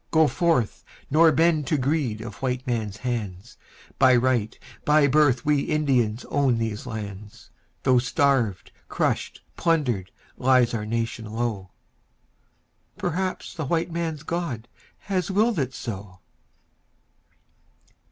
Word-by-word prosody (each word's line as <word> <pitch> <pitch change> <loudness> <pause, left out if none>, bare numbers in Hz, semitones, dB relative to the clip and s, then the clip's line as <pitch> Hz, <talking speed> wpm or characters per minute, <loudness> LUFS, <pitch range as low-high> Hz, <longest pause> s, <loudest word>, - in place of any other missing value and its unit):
Go 160 0 +5
forth, 160 - 0 0.3
nor 160 +2 +6
bend 155 -1 +2
to 155 - +2
greed 130 -5 0
of 110 -3 -8
white 130 0 -2
men's 110 -5 -2
hands, 105 -4 -4 0.4
By 130 -2 +6
right, 120 -3 +1 0.3
by 150 0 +4
birth 140 -3 +3
we 150 -1 +3
Indians 130 -7 0
own 135 -4 +2
these 115 +1 -3
lands, 105 -3 -8 0.3
Though 130 -2 +4
starved, 125 -5 +1 0.2
crushed, - - -1
plundered, 125 - 0 0.3
lies 125 -2 +3
our 105 -2 -3
nation 115 0 -2
low... 110 -3 -3 1.3
Perhaps 185 +2 -3
the 160 - -4
white 165 +4 0
man's 165 -3 -3
God 160 -9 -3 0.3
has 185 -3 -2
willed 210 0 +2
it 130 -2 -2
so. 100 -4 -7
130 Hz, 120 wpm, -25 LUFS, 115-155 Hz, 1.3 s, nor